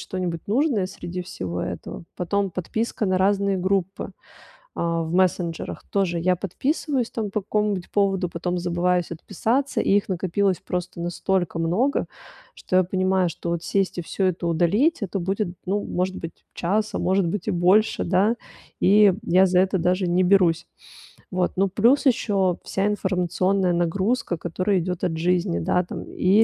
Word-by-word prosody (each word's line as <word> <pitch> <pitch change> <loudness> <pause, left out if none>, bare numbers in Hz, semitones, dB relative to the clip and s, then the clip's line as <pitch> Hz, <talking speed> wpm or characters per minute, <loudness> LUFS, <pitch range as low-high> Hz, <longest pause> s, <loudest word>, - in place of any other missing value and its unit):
что-нибудь 180 -3 -4
нужное 235 -4 +2
среди 180 -1 -6
всего 90 - -5
этого. 90 - -6
Потом 195 +2 -1
подписка 215 +5 -2
на 185 -1 +1
разные 200 0 +2
группы, 190 0 -1 0.7
а, 170 0 0
в 160 0 -4
мессенджерах. 180 -3 0
Тоже 185 -4 0
я 180 +2 +3
подписываюсь 260 - -1
там 215 -3 -3
по 210 +1 -2
какому-нибудь 205 -2 -1
поводу, 195 -3 +1
потом 180 +1 -3
забываюсь 175 0 0
отписаться. 245 - -1
И - - +1
их 205 - 0
накопилось 190 +1 0
просто 180 -1 -4
настолько 175 0 -1
много, 205 +13 +1 0.5
что 185 - -2
я 185 - +5
понимаю, 185 0 +1
что 170 +1 -5
вот 170 -1 -2
сесть 195 -2 0
и - - -1
всё 190 +3 -2
это 180 -1 -1
удалить- 205 - +2
это 195 0 -2
будет, 195 +3 -1 0.2
ну, 200 +2 0
может 185 +1 -2
быть, 165 0 -8
час, 210 +5 0
а - - 0
может 190 0 +1
быть, 185 +2 -3
и - - +1
больше, 185 +5 +3
да, 190 +5 +2 0.5
и 200 0 +6
я 185 -1 +5
за 180 -1 +3
это 190 +1 +1
даже 180 +2 +1
не 180 +2 +3
берусь. 180 -3 +3 0.7
Вот, 180 -1 0
ну, 195 +1 +2
плюс 235 +10 +3
ещё 200 -8 +2
вся 195 - -1
информационная 190 -1 +1
нагрузка, 185 +4 0
которая 185 +4 0
идёт 180 0 -4
от 165 -2 -1
жизни, 170 - +1
да, 180 - +1
там: - - -6
и 195 +4 +3
185 Hz, 165 wpm, -24 LUFS, 175-200 Hz, 0.7 s, и